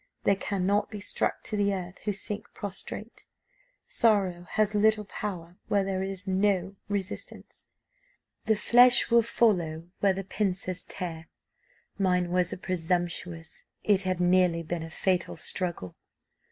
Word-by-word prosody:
They 200 Hz, -, +4 dB
cannot 200 Hz, +1 st, 0 dB
be 210 Hz, -, -7 dB
struck 205 Hz, -, -1 dB
to -, -, -3 dB
the 200 Hz, -1 st, +2 dB
earth 180 Hz, 0 st, -7 dB
who 210 Hz, -, +1 dB
sink 205 Hz, +1 st, -5 dB
prostrate; 205 Hz, +2 st, -6 dB, 0.6 s
sorrow 200 Hz, -, +1 dB
has 215 Hz, -1 st, +2 dB
little 215 Hz, 0 st, +3 dB
power 180 Hz, -4 st, -6 dB
where 200 Hz, -1 st, +2 dB
there 190 Hz, -1 st, -2 dB
is 195 Hz, 0 st, -4 dB
no 190 Hz, 0 st, +1 dB
resistance. 200 Hz, -1 st, -5 dB, 0.8 s
'The 220 Hz, -, +3 dB
flesh 245 Hz, +4 st, +5 dB
will 235 Hz, 0 st, +7 dB
follow 175 Hz, -8 st, +1 dB
where 195 Hz, -1 st, +3 dB
the 195 Hz, +1 st, -4 dB
pincers 185 Hz, -2 st, -2 dB
tear.' 170 Hz, -3 st, -5 dB, 0.7 s
Mine 180 Hz, -2 st, +2 dB
was 180 Hz, -1 st, +2 dB
a -, -, -4 dB
presumptuous 175 Hz, -2 st, -3 dB, 0.2 s
it 200 Hz, -2 st, +3 dB
had 185 Hz, -2 st, -1 dB
nearly 180 Hz, -1 st, +3 dB
been 165 Hz, +1 st, -3 dB
a 165 Hz, -, -6 dB
fatal 180 Hz, +2 st, 0 dB
struggle. 170 Hz, -, -2 dB
190 Hz, 140 wpm, -28 LUFS, 175-205 Hz, 0.8 s, will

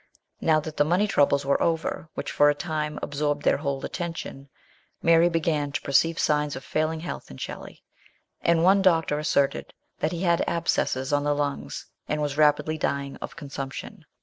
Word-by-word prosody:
Now 155 Hz, -1 st, +4 dB
that 155 Hz, 0 st, -8 dB
the -, -, +5 dB
money 180 Hz, +7 st, +2 dB
troubles 140 Hz, -6 st, +2 dB
were 140 Hz, -, +2 dB
over, 165 Hz, -1 st, -1 dB
which -, -, -4 dB
for 145 Hz, 0 st, +5 dB
a 145 Hz, -, +2 dB
time 155 Hz, -3 st, -3 dB
absorbed 145 Hz, 0 st, -1 dB
their -, -, +3 dB
whole 140 Hz, -2 st, -3 dB
attention, 165 Hz, -5 st, -6 dB, 0.5 s
Mary 165 Hz, +1 st, +5 dB
began 155 Hz, -3 st, 0 dB
to -, -, -2 dB
perceive 165 Hz, +4 st, +2 dB
signs 150 Hz, -1 st, +1 dB
of 130 Hz, -, -7 dB
failing 155 Hz, +1 st, -1 dB
health 175 Hz, -, -6 dB
in 65 Hz, -, -10 dB
Shelley, -, -, -8 dB, 0.6 s
and 170 Hz, -1 st, +3 dB
one 195 Hz, +2 st, +5 dB
doctor 165 Hz, -5 st, +3 dB
asserted 140 Hz, -2 st, 0 dB, 0.2 s
that 155 Hz, -, 0 dB
he 175 Hz, +1 st, -3 dB
had 170 Hz, -2 st, +3 dB
abscesses 135 Hz, -5 st, 0 dB
ou 145 Hz, -, +3 dB
the 145 Hz, 0 st, +1 dB
lungs, 145 Hz, -1 st, -3 dB, 0.2 s
and 150 Hz, -, -1 dB
was 145 Hz, -2 st, -1 dB
rapidly 150 Hz, +1 st, +2 dB
dying 140 Hz, -1 st, -2 dB
of -, -, -8 dB
consumption. 140 Hz, -4 st, -7 dB
150 Hz, 175 wpm, -26 LUFS, 145-165 Hz, 0.6 s, the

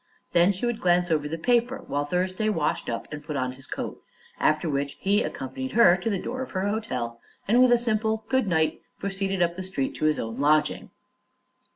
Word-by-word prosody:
Then 175 Hz, +3 st, +5 dB
he 195 Hz, +4 st, -3 dB
would 240 Hz, -2 st, -1 dB
glance 175 Hz, -2 st, +2 dB
over 150 Hz, -2 st, +1 dB
the 165 Hz, +2 st, -4 dB
paper 245 Hz, +7 st, +1 dB
while 145 Hz, +1 st, -1 dB
Thursday 185 Hz, +6 st, 0 dB
washed 150 Hz, -11 st, -1 dB
up 115 Hz, -, -4 dB
and 150 Hz, 0 st, -6 dB
put 150 Hz, 0 st, -5 dB
on 130 Hz, -2 st, -1 dB
his 130 Hz, +1 st, -12 dB
coat, -, -, -5 dB, 0.4 s
after 155 Hz, +2 st, +2 dB
which 140 Hz, -1 st, -2 dB
he 200 Hz, +2 st, +2 dB
accompanied 130 Hz, 0 st, -4 dB
her 220 Hz, -6 st, +7 dB
to 190 Hz, +5 st, -2 dB
the 200 Hz, -, 0 dB
door 255 Hz, +7 st, -4 dB
of 260 Hz, -, -5 dB
her 190 Hz, +1 st, 0 dB
hotel 125 Hz, -, -3 dB, 0.3 s
and 235 Hz, +5 st, +5 dB
with 255 Hz, -1 st, +6 dB
a 240 Hz, -, +7 dB
simple 220 Hz, -1 st, 0 dB
"good 260 Hz, -4 st, +1 dB
night" 160 Hz, -3 st, +1 dB, 0.2 s
proceeded 195 Hz, -1 st, -1 dB
up 170 Hz, 0 st, 0 dB
the 190 Hz, -, -5 dB
street 185 Hz, -8 st, -2 dB
to -, -, -1 dB
his 155 Hz, 0 st, +3 dB
own 115 Hz, +2 st, -4 dB
lodging. 150 Hz, +1 st, +2 dB
180 Hz, 210 wpm, -26 LUFS, 150-215 Hz, 0.4 s, her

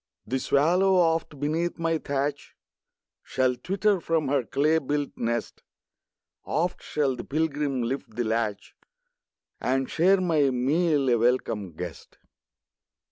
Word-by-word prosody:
The 130 Hz, +4 st, -1 dB
swallow, 180 Hz, +9 st, +3 dB
oft, 165 Hz, -4 st, +1 dB
beneath 160 Hz, +4 st, -1 dB
my 165 Hz, -1 st, 0 dB
thatch, 140 Hz, 0 st, -3 dB, 0.7 s
Shall 130 Hz, -1 st, 0 dB
twitter 195 Hz, +6 st, 0 dB
from 160 Hz, -4 st, 0 dB
her 140 Hz, -2 st, +2 dB
clay 155 Hz, +6 st, +2 dB
built 145 Hz, 0 st, -2 dB
nest; 120 Hz, 0 st, -3 dB, 0.8 s
Oft 175 Hz, +3 st, -1 dB
shall 140 Hz, -3 st, -1 dB
the -, -, -7 dB
pilgrim 145 Hz, -3 st, -1 dB
lift 120 Hz, -2 st, -4 dB
the 120 Hz, -, 0 dB
latch, 110 Hz, -2 st, -2 dB, 0.9 s
And 135 Hz, +1 st, 0 dB
share 185 Hz, +4 st, +3 dB
my 160 Hz, -6 st, +2 dB
meal, 140 Hz, +3 st, +1 dB
a 120 Hz, -2 st, +4 dB
welcome 110 Hz, -6 st, 0 dB
guest. 85 Hz, -1 st, -8 dB
145 Hz, 125 wpm, -26 LUFS, 125-165 Hz, 0.9 s, a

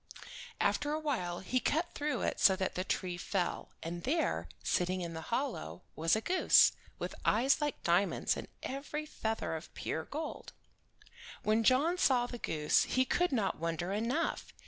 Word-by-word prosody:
After 295 Hz, 0 st, +1 dB
awhile 255 Hz, -, -2 dB
he 255 Hz, +7 st, 0 dB
cut 325 Hz, +7 st, 0 dB
through 295 Hz, 0 st, -1 dB
it -, -, -1 dB
so 190 Hz, -, +6 dB
that 190 Hz, 0 st, -2 dB
the 185 Hz, -, -2 dB
tree 180 Hz, -1 st, -2 dB
fell, 180 Hz, 0 st, -2 dB
and 170 Hz, +1 st, -4 dB
there, 320 Hz, -, 0 dB
sitting 180 Hz, +1 st, 0 dB
in 170 Hz, -1 st, -4 dB
the 160 Hz, -, -5 dB
hollow, 235 Hz, -, -3 dB
was 165 Hz, +3 st, +2 dB
a 220 Hz, -, -1 dB
goose, 365 Hz, +9 st, +5 dB, 0.3 s
with -, -, -4 dB
eyes 265 Hz, +7 st, +3 dB
like 295 Hz, -1 st, -2 dB
diamonds, 175 Hz, +4 st, +2 dB
and -, -, -6 dB, 0.2 s
every 290 Hz, +3 st, -4 dB
feather 225 Hz, -, -3 dB
of 160 Hz, -, -8 dB
pure 160 Hz, 0 st, -3 dB
gold. 310 Hz, +2 st, -6 dB, 0.9 s
When 215 Hz, +1 st, +2 dB
John 290 Hz, +10 st, +3 dB
saw 250 Hz, -6 st, +4 dB
the 245 Hz, -1 st, -7 dB
goose 150 Hz, -6 st, +2 dB
he 255 Hz, 0 st, +2 dB
could 355 Hz, +5 st, +1 dB
not 215 Hz, -, 0 dB
wonder 170 Hz, +3 st, -2 dB
enough. 240 Hz, +10 st, -1 dB
225 Hz, 165 wpm, -33 LUFS, 175-290 Hz, 0.9 s, so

